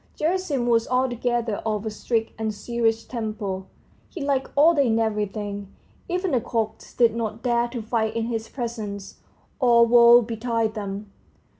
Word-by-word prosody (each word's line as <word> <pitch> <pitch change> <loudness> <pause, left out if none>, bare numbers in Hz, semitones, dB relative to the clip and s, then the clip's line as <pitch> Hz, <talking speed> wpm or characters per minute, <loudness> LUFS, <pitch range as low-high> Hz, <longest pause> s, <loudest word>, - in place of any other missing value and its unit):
Gerasim 315 -6 0
was 230 -1 +2
altogether 245 -3 0
of 215 -1 -3
a 220 - -2
strict 225 +1 -1
and 220 -1 -1
serious 225 +1 -1
temper, 215 -5 -4 0.4
he 360 - -8
liked 275 -2 0
order 300 +1 +5
in 230 -4 +2
everything; 205 -2 -2 0.4
even 360 0 -1
the 250 - +2
cocks 220 -2 -3
did 235 -2 +4
not 225 -1 -4
dare 240 -1 +2
to 240 -2 -6
fight 220 -1 -1
in 230 -1 0
his 225 -1 -3
presence, 220 -6 -6 0.4
or 235 -3 +6
woe 235 0 +7
betide 225 -1 -1
them! 200 -1 -6
230 Hz, 150 wpm, -24 LUFS, 215-245 Hz, 0.4 s, woe